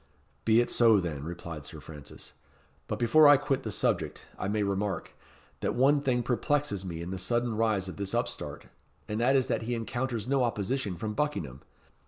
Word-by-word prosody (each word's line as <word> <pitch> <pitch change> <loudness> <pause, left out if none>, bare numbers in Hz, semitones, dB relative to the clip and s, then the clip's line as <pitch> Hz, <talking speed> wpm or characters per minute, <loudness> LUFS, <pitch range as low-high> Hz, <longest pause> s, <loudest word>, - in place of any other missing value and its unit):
"Be 115 0 +5
it 120 - -2
so, 115 -3 +5
then," 80 -6 -3
replied 85 -2 -6
Sir - - -9
Francis. 75 -3 -10 0.6
"But - - -2
before 150 +6 +6
I 145 -1 +8
quit 140 -1 -1
the - - -5
subject, - - -1
I 95 - -3
may 105 +1 0
remark, 100 0 -2 0.5
that - - -1
one 140 +3 +4
thing 125 -3 +1
perplexes 130 -3 0
me 85 -3 -5
in 90 - -6
the 95 - -4
sudden 120 +4 0
rise 105 -4 +1
of 90 - -7
this 100 -1 -3
upstart, - - -3 0.4
and 105 0 -2
that 130 +3 +4
is 130 -2 +3
that - - -1
he 120 +2 -2
encounters 120 -1 -3
no 135 -1 +2
opposition 110 -2 -1
from 105 +5 -4
Buckingham. 105 - -2
110 Hz, 190 wpm, -29 LUFS, 95-130 Hz, 0.6 s, I